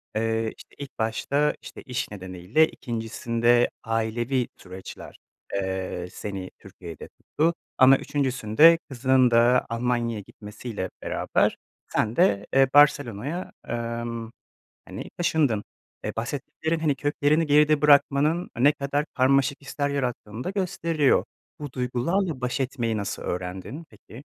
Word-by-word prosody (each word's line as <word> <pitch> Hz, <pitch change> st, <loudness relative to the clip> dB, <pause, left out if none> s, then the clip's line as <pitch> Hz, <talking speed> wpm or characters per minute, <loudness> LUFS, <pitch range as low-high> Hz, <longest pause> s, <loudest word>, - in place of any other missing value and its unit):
Eee, 110 Hz, 0 st, 0 dB
işte, -, -, -16 dB
ilk 140 Hz, -4 st, -9 dB
başta, 140 Hz, +6 st, 0 dB
işte, -, -, -10 dB
iş 125 Hz, -4 st, -4 dB
nedeniyle, 95 Hz, -, +1 dB
2’ncisinde 120 Hz, 0 st, 0 dB
ailevi 115 Hz, +3 st, -1 dB
süreçler, 95 Hz, 0 st, -10 dB, 0.4 s
eee, 95 Hz, -2 st, -3 dB
seni 95 Hz, -3 st, -6 dB
Türkiye'de 85 Hz, -5 st, -10 dB
tuttu. 165 Hz, +3 st, -1 dB, 0.2 s
Ama 135 Hz, +1 st, +7 dB
3’üncüsünde 135 Hz, +3 st, +4 dB
kızının 130 Hz, -1 st, +3 dB
da 120 Hz, +2 st, +4 dB
Almanya'ya 115 Hz, -1 st, -1 dB
gitmesiyle 105 Hz, 0 st, -7 dB
beraber -, -, 0 dB, 0.3 s
sen 110 Hz, +1 st, -1 dB
de, 105 Hz, -, +3 dB
eee, 135 Hz, 0 st, +5 dB
Barcelona'ya, 145 Hz, -, +3 dB, 0.2 s
emm, 115 Hz, -1 st, -4 dB, 0.6 s
hani, -, -, -8 dB
taşındın. 145 Hz, -11 st, +1 dB, 0.4 s
Eee, -, -, -3 dB
bahsettiklerin, 145 Hz, +7 st, -3 dB
hani, 155 Hz, -3 st, +1 dB
köklerini 145 Hz, +3 st, +1 dB
geride 150 Hz, 0 st, +4 dB
bırakmanın 150 Hz, +3 st, +4 dB
ne 140 Hz, +4 st, +6 dB
kadar 145 Hz, 0 st, -2 dB
karmaşık 135 Hz, +2 st, +2 dB
hisler 140 Hz, +1 st, -2 dB
yarattığını 125 Hz, -5 st, -3 dB
da -, -, -3 dB
gösteriyor. 170 Hz, -6 st, +1 dB, 0.4 s
Bu 145 Hz, -3 st, -7 dB
duygularla 130 Hz, +6 st, -1 dB
baş 125 Hz, +2 st, -2 dB
etmeyi 125 Hz, -4 st, -1 dB
nasıl 100 Hz, -1 st, -4 dB
öğrendin 95 Hz, -, -5 dB
peki? 115 Hz, +5 st, -14 dB
125 Hz, 120 wpm, -25 LUFS, 110-145 Hz, 0.6 s, Ama